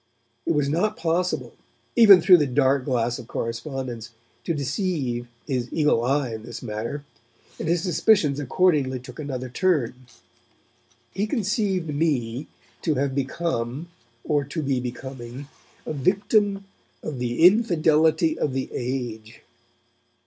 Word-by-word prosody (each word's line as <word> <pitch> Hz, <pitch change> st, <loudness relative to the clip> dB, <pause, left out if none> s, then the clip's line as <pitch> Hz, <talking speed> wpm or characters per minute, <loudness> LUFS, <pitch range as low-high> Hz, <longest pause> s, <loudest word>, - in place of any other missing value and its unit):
It -, -, +3 dB
was 145 Hz, -1 st, +2 dB
not 185 Hz, +9 st, 0 dB
possible, 175 Hz, +2 st, -1 dB, 0.4 s
even 205 Hz, -6 st, +9 dB
through 180 Hz, +2 st, +8 dB
the 150 Hz, -3 st, +1 dB
dark 130 Hz, +1 st, +2 dB
glass 120 Hz, -3 st, 0 dB
of 115 Hz, -, -10 dB
correspondence, 120 Hz, -1 st, -4 dB, 0.4 s
to 170 Hz, -, 0 dB
deceive 135 Hz, -, -2 dB, 0.2 s
his 125 Hz, -4 st, -2 dB
eagle 150 Hz, -7 st, +2 dB
eye 130 Hz, -1 st, 0 dB
in 110 Hz, -, -6 dB
this 120 Hz, +2 st, -8 dB
matter, 115 Hz, +6 st, -4 dB, 0.5 s
and -, -, -3 dB
his 170 Hz, +1 st, +1 dB
suspicions 175 Hz, -5 st, +3 dB
accordingly 145 Hz, -2 st, +2 dB
took 125 Hz, +2 st, -12 dB
another 130 Hz, -4 st, -4 dB
turn. 130 Hz, -5 st, 0 dB, 1.1 s
He 200 Hz, +3 st, -1 dB
conceived 200 Hz, -, -1 dB
me 140 Hz, -4 st, -1 dB, 0.3 s
to 155 Hz, -3 st, 0 dB
have 135 Hz, 0 st, 0 dB
become, 140 Hz, +1 st, -2 dB, 0.3 s
or 145 Hz, -1 st, +1 dB
to 145 Hz, +3 st, -4 dB
be 135 Hz, -2 st, 0 dB
becoming, 125 Hz, +1 st, -7 dB, 0.4 s
a -, -, -3 dB
victim 200 Hz, -, +1 dB, 0.4 s
of 140 Hz, -5 st, -5 dB
'the 120 Hz, +6 st, +2 dB
infidelity 160 Hz, -5 st, +4 dB
of 140 Hz, -, 0 dB
the 130 Hz, 0 st, -2 dB
age.' 120 Hz, -3 st, -5 dB
140 Hz, 130 wpm, -24 LUFS, 125-170 Hz, 1.1 s, even